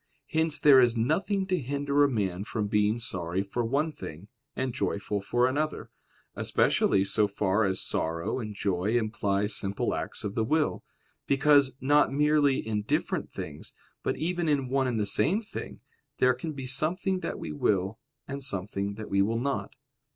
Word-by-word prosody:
Hence 160 -1 +2
there 140 -2 +7
is 120 -1 +3
nothing 190 - 0
to 185 -2 0
hinder 140 +2 +1
a 145 - +4
man 100 -6 -1
from 105 0 -3
being 105 +1 +2
sorry 95 -5 -1
for 110 +5 -3
one 140 +7 0
thing, 90 - -9 0.3
and 130 -1 -2
joyful 100 -4 -2
for 120 +5 +1
another; 150 +4 -2 0.4
especially 95 - +2
so 100 +2 +2
far 100 +1 +1
as 95 -1 0
sorrow 85 +8 -2
and 105 -3 -6
joy 100 +3 0
imply 105 -3 0
simple 100 -1 +1
acts - - -3
of 100 - -3
the 110 - 0
will; 155 +6 0 0.4
because, 140 -1 +4
not 145 +2 +3
merely 145 -1 +3
in 105 -1 -1
different 105 - -1
things, 75 -1 -8 0.3
but - - -2
even 175 0 -1
in 140 -4 +1
one 135 0 +1
and 120 -3 -1
the 105 - +1
same 165 - +2
thing, 220 - -8 0.4
there 130 0 +4
can 155 +6 -5
be 135 -2 -6
something 170 +8 0
that - - -4
we 80 - -6
will, 95 +7 0 0.3
and 140 0 -5
something 100 -4 -3
that 110 0 -7
we 100 0 +2
will 115 +3 +1
not. 140 +3 -3
120 Hz, 175 wpm, -28 LUFS, 100-145 Hz, 0.4 s, there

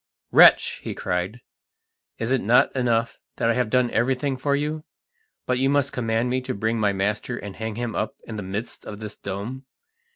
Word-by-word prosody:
"Wretch!" - - +6
he - - -5
cried, 90 +7 -2 0.8
"is 115 +2 -2
it 135 - +2
not 115 +6 +4
enough 115 -3 0 0.2
that 115 - +2
I - - +2
have 125 -2 0
done 125 0 +2
everything 130 +3 +1
for 140 +2 0
you, 150 +2 -2 0.6
but 125 0 0
you 135 +1 +3
must 140 0 +1
command 115 0 0
me 130 +1 0
to 130 0 -4
bring 110 +3 0
my 105 -2 +3
master 105 +5 -1
and 100 -2 -7
hang 110 -1 -4
him 120 -1 -3
up 110 - -2
in 110 - -7
the 105 - -4
midst 100 +5 -5
of 105 -1 -8
this 105 -1 -7
dome? 115 +8 -6
115 Hz, 195 wpm, -24 LUFS, 105-130 Hz, 0.8 s, Wretch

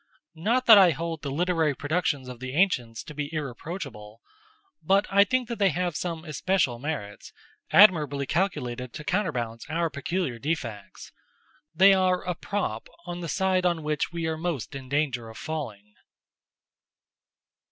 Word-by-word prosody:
Not 230 +10 0
that 220 -3 +10
I 185 -2 +7
hold 165 +2 -4
the 140 - -4
literary 160 0 +1
productions 145 -3 -1
of 125 -2 -8
the 130 +1 -6
ancients 125 -11 +1
to - - -10
be 145 0 -4
irreproachable; 135 - -6 0.6
but 195 +5 +3
I 200 +1 +7
think 255 +4 0
that 235 -3 -5
they 200 -1 +4
have 175 0 -2
some 165 -1 -4
especial 155 -5 0
merits, 120 -8 -5 0.4
admirably 150 -8 +5
calculated 125 -9 -2
to 150 - -7
counterbalance 125 - -2
our 165 0 0
peculiar 140 -2 -3
defects. 120 -8 -5 0.6
They 195 +4 +7
are 185 -1 +2
a 180 - -2
prop 170 - -3 0.2
on 175 0 -5
the 170 -2 -5
side 190 -1 +1
on 170 -3 +1
which 150 +2 -1
we 170 -1 -3
are 160 - 0
in - - -10
most 165 -10 -3
danger 135 -3 -2
of 110 - -11
falling. 110 -10 -6
160 Hz, 150 wpm, -26 LUFS, 130-180 Hz, 0.6 s, that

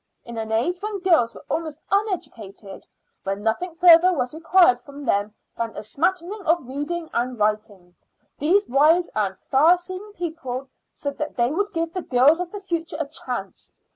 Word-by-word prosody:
In 235 - -8
an 220 0 -4
age 255 +12 0
when 420 0 -3
girls 325 -11 +3
were - - -13
almost 315 -3 -3
uneducated, 230 - -3 0.3
when 195 +1 -4
nothing 320 +11 -1
further 345 +1 +7
was 250 -7 -1
required 330 -4 +4
from 280 +1 -11
them 205 -1 0 0.2
than 230 -1 -4
a - - -5
smattering 360 - -1
of 330 -3 +2
reading 305 +5 -4
and 245 +1 -1
writing, 210 -4 -2 0.5
these 385 +8 +3
wise 310 +6 +3
and 200 -3 -1
far 315 +7 +4
seeing 370 +4 -8
people 310 -8 -5 0.2
said 285 -1 -6
that 300 - -4
they 240 +3 +1
would 405 +4 -1
give 330 0 -2
the 370 - -3
girls 275 +4 +4
of 360 -1 -4
the 410 - -7
future 335 -4 -3
a 310 - 0
chance. 250 -9 -6
300 Hz, 170 wpm, -23 LUFS, 235-350 Hz, 0.5 s, further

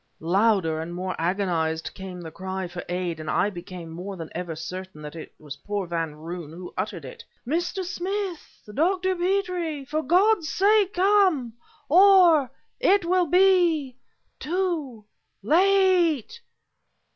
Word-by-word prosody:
Louder 180 -2 +2
and 170 +2 -6
more 185 +1 -3
agonized 165 -3 -1
came 185 -2 -8
the 165 -2 -8
cry 190 0 -5
for 175 0 -7
aid, 175 -2 -3
and 155 - -6
I 205 - +1
became 175 -2 -9
more 185 +4 -7
than 165 -2 -8
ever 175 -2 -4
certain 180 0 -8
that 150 +2 -8
it 160 - -9
was 145 -2 -9
poor 205 -2 -4
Van 165 -3 -3
Roon 165 +1 -7
who 175 +2 -9
uttered 185 -5 -4
it. 130 - -10 0.2
"Mr. 345 +7 -1
Smith! 360 - -5
Dr. 370 - +1
Petrie! 355 -5 -1
for 305 +3 -2
God's 360 +3 +3
sake 405 0 +3
come... 370 - +3 0.3
or... 350 -5 +6 0.3
it 395 -2 +3
will 360 0 +2
be... 350 -7 +3 0.4
too... 315 - -2 0.4
late..." 365 - +3
245 Hz, 135 wpm, -25 LUFS, -, 0.4 s, or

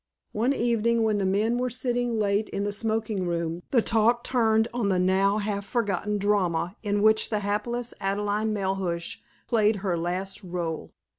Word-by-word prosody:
One 230 +5 +1
evening, 235 -2 +1
when 215 -2 +1
the 195 - +1
men 215 +5 +1
were 250 0 0
sitting 245 -1 -1
late 205 0 +1
in 200 - -2
the 205 - -1
smoking 215 -2 -1
room, 170 0 -2
the 240 -4 +3
talk 230 +2 +2
turned 225 -3 +2
on 235 -4 0
the 190 - +2
now 190 +3 +3
half 205 -1 -2
forgotten 210 -1 -1
drama 190 -3 0
in 205 -1 0
which 220 0 +4
the 210 -2 -1
hapless 230 +4 -2
Adelaide 205 +2 -1
Melhuish 190 -5 -2 0.3
played 220 -2 +3
her 180 -3 +1
last 180 +4 -3
rôle. 170 -3 -4
210 Hz, 165 wpm, -26 LUFS, 195-225 Hz, 0.3 s, which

